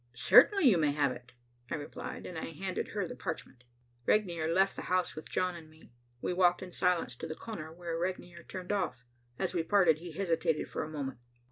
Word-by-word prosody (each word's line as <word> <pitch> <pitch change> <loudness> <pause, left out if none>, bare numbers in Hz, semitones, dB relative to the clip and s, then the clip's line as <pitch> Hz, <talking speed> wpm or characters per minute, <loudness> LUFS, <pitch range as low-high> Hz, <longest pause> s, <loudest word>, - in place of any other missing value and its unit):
"Certainly 395 - +7
you 195 -8 +6
may 150 -2 +2
have 145 -2 +2
it," 125 -1 -10 0.4
I - - -1
replied, 145 -1 -6
and 180 - -7
I 160 - -3
handed 185 +4 -3
her 200 -4 0
the - - -7
parchment. 130 -5 -6 0.4
Regnier 170 -6 +2
left 195 +3 +3
the - - -5
house 185 0 +1
with 155 - -8
John 185 -1 0
and 160 -2 -11
me. 155 -5 -19 0.3
We - - 0
walked 180 0 +3
in 185 - -8
silence 175 -9 +1
to - - -5
the 155 - -5
corner 165 -8 -7
where 170 0 -5
Regnier 175 -1 -4
turned 185 +1 -6
off. 150 -12 -1 0.3
As 190 - -1
we 170 - +1
parted, 165 -3 +4
he 170 -1 -8
hesitated 165 -3 0
for - - -3
a - - -4
moment. 140 -5 -4
170 Hz, 210 wpm, -32 LUFS, 155-185 Hz, 0.4 s, Certainly